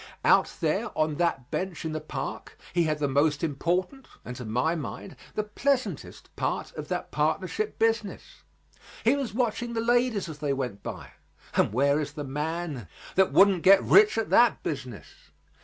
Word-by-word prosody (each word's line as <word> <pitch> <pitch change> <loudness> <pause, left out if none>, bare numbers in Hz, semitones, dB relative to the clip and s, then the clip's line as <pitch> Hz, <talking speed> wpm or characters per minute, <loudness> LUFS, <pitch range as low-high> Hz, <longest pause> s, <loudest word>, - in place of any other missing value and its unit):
Out - - +4
there - - 0
on 155 -1 +1
that 170 -8 -1
bench 185 -4 -3
in 160 - -2
the 155 0 -3
park 140 -3 -6 0.2
he 175 -2 +2
had 155 -1 0
the 150 -1 0
most 145 +2 +1
important, 180 - -1 0.2
and 125 - -6
to 125 - -7
my 125 +9 0
mind, 170 +3 -6 0.2
the 215 - 0
pleasantest 255 +5 -2
part - - -2
of - - -7
that - - -4
partnership 430 0 -1
business. 225 -2 -1 0.6
He - - +4
was 255 -7 -4
watching 240 -1 -1
the 230 - -1
ladies 240 -3 +1
as 155 -2 -8
they 145 -2 0
went 125 -7 -4
by; - - -7 0.4
and - - +3
where 140 +5 +2
is 150 - -5
the 145 - -5
man 150 - -4 0.3
that 190 0 +3
wouldn't 195 -3 +5
get 195 +2 +6
rich 415 - +5
at 225 - -1
that 240 -1 +4
business? 130 -7 -5
165 Hz, 175 wpm, -27 LUFS, 145-215 Hz, 0.6 s, get